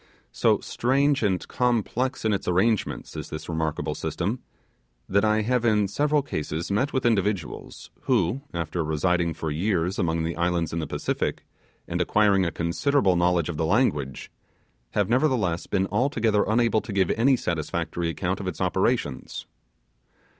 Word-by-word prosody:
So -, -, +2 dB
strange 140 Hz, +3 st, +1 dB
and 95 Hz, -4 st, 0 dB
complex 125 Hz, +1 st, 0 dB
in 110 Hz, -, +3 dB
its 100 Hz, -, -3 dB
arrangements 95 Hz, +5 st, 0 dB
is -, -, -6 dB
this 80 Hz, -, -6 dB
remarkable 80 Hz, -2 st, -2 dB
system, -, -, -2 dB, 0.7 s
that 100 Hz, +2 st, +2 dB
I 110 Hz, 0 st, +2 dB
have 125 Hz, +2 st, +1 dB
in 105 Hz, -3 st, +3 dB
several 145 Hz, +7 st, +1 dB
cases 80 Hz, -, -4 dB
met 130 Hz, +8 st, +1 dB
with 130 Hz, -, -1 dB
individuals 100 Hz, -7 st, -1 dB
who, 115 Hz, +11 st, +1 dB
after 85 Hz, 0 st, -2 dB
residing 85 Hz, +2 st, 0 dB
for 80 Hz, -, -3 dB
years 90 Hz, +2 st, 0 dB
among 80 Hz, -1 st, 0 dB
the 85 Hz, +1 st, -2 dB
islands 85 Hz, -2 st, 0 dB
in 85 Hz, -, -1 dB
the 80 Hz, -, -3 dB
Pacific, -, -, -2 dB, 0.4 s
and -, -, -1 dB
acquiring 100 Hz, -3 st, +3 dB
a -, -, -2 dB
considerable 95 Hz, +5 st, +1 dB
knowledge 85 Hz, -2 st, +2 dB
of 85 Hz, -3 st, -4 dB
the 80 Hz, -, 0 dB
language, 75 Hz, -, 0 dB, 0.6 s
have -, -, +1 dB
nevertheless 120 Hz, -, +1 dB
been 95 Hz, -1 st, +1 dB
altogether 115 Hz, -6 st, +2 dB
unable 115 Hz, 0 st, +2 dB
to -, -, -8 dB
give 95 Hz, -3 st, +2 dB
any 130 Hz, +4 st, +3 dB
satisfactory 85 Hz, -3 st, -2 dB
account 80 Hz, -, -2 dB
of -, -, -5 dB
its -, -, -4 dB
operations. 65 Hz, -3 st, -1 dB
95 Hz, 155 wpm, -25 LUFS, 85-115 Hz, 0.7 s, in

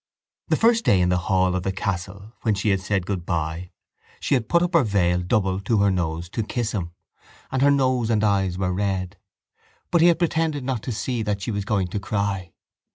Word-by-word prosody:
The -, -, +2 dB
first 230 Hz, 0 st, +3 dB
day 95 Hz, -, +4 dB
in 90 Hz, 0 st, +2 dB
the 90 Hz, 0 st, +2 dB
hall 95 Hz, -1 st, +2 dB
of 95 Hz, -, -1 dB
the 95 Hz, -, -1 dB
castle 100 Hz, +2 st, -4 dB
when 110 Hz, -3 st, +1 dB
she 100 Hz, +2 st, 0 dB
had 95 Hz, -1 st, +1 dB
said 95 Hz, -1 st, -1 dB
goodbye 85 Hz, -2 st, -3 dB, 0.5 s
she -, -, -1 dB
had 125 Hz, -4 st, +1 dB
put 170 Hz, 0 st, +4 dB
up 175 Hz, +1 st, -1 dB
her 165 Hz, -4 st, +5 dB
veil 90 Hz, -5 st, +1 dB
double 95 Hz, +1 st, 0 dB
to 105 Hz, +3 st, 0 dB
her 100 Hz, -1 st, +3 dB
nose 85 Hz, -2 st, -2 dB
to 115 Hz, -, -2 dB
kiss 110 Hz, +1 st, -2 dB
him: 90 Hz, -6 st, -3 dB, 0.6 s
and 130 Hz, -, 0 dB
her 140 Hz, -, +5 dB
nose 130 Hz, -4 st, +2 dB
and 110 Hz, -2 st, +2 dB
eyes 95 Hz, -3 st, +1 dB
were 95 Hz, -1 st, -1 dB
red. 95 Hz, -1 st, -2 dB, 0.7 s
But 170 Hz, -, +4 dB
he 170 Hz, -, +7 dB
had 170 Hz, -, +4 dB
pretended 160 Hz, -4 st, 0 dB
not 125 Hz, -4 st, -2 dB
to 125 Hz, -, -4 dB
see 120 Hz, +2 st, -2 dB
that 105 Hz, -2 st, -1 dB
she 115 Hz, -, -2 dB
was 100 Hz, -2 st, -3 dB
going 100 Hz, -3 st, 0 dB
to 100 Hz, -, -3 dB
cry. 100 Hz, -4 st, -2 dB
100 Hz, 220 wpm, -23 LUFS, 95-120 Hz, 0.7 s, he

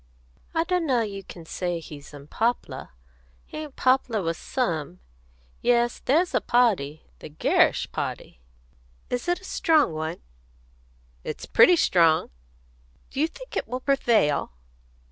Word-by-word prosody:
"I 325 Hz, -, +3 dB
d'know 330 Hz, -9 st, +1 dB
as 210 Hz, -, -4 dB
you 195 Hz, 0 st, -7 dB
can 170 Hz, -3 st, -11 dB
say 175 Hz, +1 st, -3 dB
he's 150 Hz, -3 st, -11 dB
unpoplah. 150 Hz, -, -3 dB, 0.6 s
He -, -, -9 dB
ain't 300 Hz, -3 st, -8 dB
poplah 255 Hz, -5 st, +2 dB
with 165 Hz, 0 st, -1 dB
some. 160 Hz, -, -3 dB, 0.6 s
Yes, 240 Hz, 0 st, +2 dB
there's 335 Hz, +7 st, +2 dB
a -, -, +2 dB
party 195 Hz, -, +1 dB, 0.2 s
the -, -, -9 dB
Gerrish 150 Hz, -, +2 dB
party." -, -, -5 dB, 0.7 s
"Is 245 Hz, +6 st, -2 dB
it 350 Hz, +1 st, 0 dB
a -, -, -19 dB
strong 315 Hz, -, +2 dB
one?" 160 Hz, +2 st, -4 dB, 1.0 s
"It's -, -, -6 dB
pretty 360 Hz, -, +6 dB
strong." 165 Hz, -, +3 dB, 0.8 s
"Do 270 Hz, -, -5 dB
you 310 Hz, -, +3 dB
think -, -, -12 dB
it -, -, -2 dB
will 250 Hz, +2 st, -3 dB
prevail?" 230 Hz, -, +2 dB
235 Hz, 135 wpm, -25 LUFS, -, 1.0 s, pretty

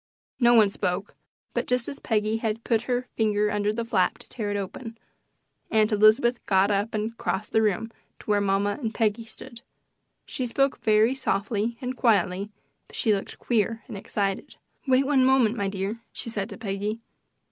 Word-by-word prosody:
No 240 Hz, -1 st, +5 dB
one 215 Hz, -3 st, +6 dB
spoke; 180 Hz, +1 st, -2 dB, 0.4 s
but -, -, -1 dB
just 250 Hz, -1 st, 0 dB
as 280 Hz, -, -6 dB
Peggy 215 Hz, 0 st, 0 dB
had 225 Hz, 0 st, -3 dB
put 225 Hz, -2 st, +1 dB
her 250 Hz, 0 st, 0 dB
finger 210 Hz, -1 st, +1 dB
under 205 Hz, 0 st, 0 dB
the 230 Hz, +2 st, -3 dB
flap 215 Hz, -1 st, +1 dB
to 245 Hz, -, -14 dB
tear 215 Hz, -5 st, -4 dB
it 205 Hz, -, -1 dB
open, 225 Hz, +4 st, -6 dB, 0.7 s
Aunt 215 Hz, -1 st, +3 dB
Elizabeth 220 Hz, +4 st, +4 dB
got 195 Hz, +1 st, +3 dB
up 205 Hz, +3 st, 0 dB
and 215 Hz, +2 st, -2 dB
crossed 200 Hz, +3 st, -2 dB
the 220 Hz, -, +3 dB
room 220 Hz, +1 st, 0 dB, 0.3 s
to -, -, -16 dB
where 205 Hz, -1 st, +2 dB
mamma 200 Hz, +3 st, 0 dB
and 225 Hz, -3 st, -3 dB
Peggy 225 Hz, 0 st, 0 dB
stood. 235 Hz, +1 st, -12 dB, 0.6 s
She 255 Hz, -, -3 dB
spoke 275 Hz, +3 st, +1 dB
very 220 Hz, +3 st, +4 dB
softly 220 Hz, -2 st, -1 dB
and 255 Hz, 0 st, -3 dB
quietly, 200 Hz, -4 st, +1 dB, 0.4 s
but -, -, -13 dB
she 220 Hz, -, +2 dB
looked 195 Hz, -, -4 dB
queer 225 Hz, -1 st, 0 dB
and 235 Hz, -, -7 dB
excited. 195 Hz, 0 st, -3 dB, 0.3 s
"Wait 260 Hz, +1 st, +4 dB
one 270 Hz, -2 st, +3 dB
moment, 255 Hz, -4 st, +4 dB
my 200 Hz, -4 st, -1 dB
dear," 195 Hz, +3 st, -3 dB
she 230 Hz, -, -5 dB
said 205 Hz, -1 st, -3 dB
to -, -, -8 dB
Peggy. 210 Hz, 0 st, -3 dB
220 Hz, 180 wpm, -26 LUFS, 205-235 Hz, 0.7 s, one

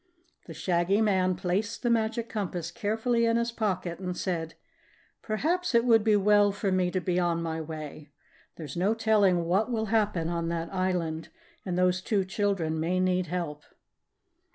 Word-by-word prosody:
The -, -, -8 dB
Shaggy 180 Hz, +3 st, +1 dB
Man 190 Hz, -4 st, +2 dB
placed 195 Hz, +6 st, -2 dB
the 240 Hz, -, +2 dB
Magic 230 Hz, 0 st, 0 dB
Compass 180 Hz, -6 st, -4 dB
carefully 225 Hz, +5 st, 0 dB
in 230 Hz, 0 st, +2 dB
his 235 Hz, 0 st, 0 dB
pocket 185 Hz, -6 st, -2 dB
and 180 Hz, -1 st, -4 dB
said: 165 Hz, -3 st, -3 dB, 0.7 s
"Perhaps 315 Hz, +8 st, -1 dB
it 235 Hz, +1 st, +4 dB
would 225 Hz, -3 st, +5 dB
be 215 Hz, -1 st, +4 dB
well 205 Hz, 0 st, +4 dB
for 200 Hz, 0 st, -2 dB
me 185 Hz, -1 st, +2 dB
to 185 Hz, -, -1 dB
be 180 Hz, 0 st, 0 dB
on 170 Hz, -1 st, +1 dB
my 160 Hz, -1 st, -3 dB
way. 155 Hz, -2 st, -8 dB, 0.5 s
There's 150 Hz, -5 st, -8 dB
no 195 Hz, +6 st, +1 dB
telling 205 Hz, -6 st, +3 dB
what 190 Hz, +8 st, +1 dB
will 220 Hz, -2 st, 0 dB
happen 205 Hz, -7 st, +1 dB
on 170 Hz, -1 st, -2 dB
that 170 Hz, +1 st, -3 dB
island 180 Hz, -4 st, -1 dB, 0.4 s
and 180 Hz, -1 st, -1 dB
those 180 Hz, 0 st, +2 dB
two 195 Hz, -1 st, 0 dB
children 185 Hz, -5 st, -1 dB
may 175 Hz, +3 st, 0 dB
need 185 Hz, -1 st, +1 dB
help." 160 Hz, -3 st, -4 dB
185 Hz, 170 wpm, -28 LUFS, 170-215 Hz, 0.7 s, would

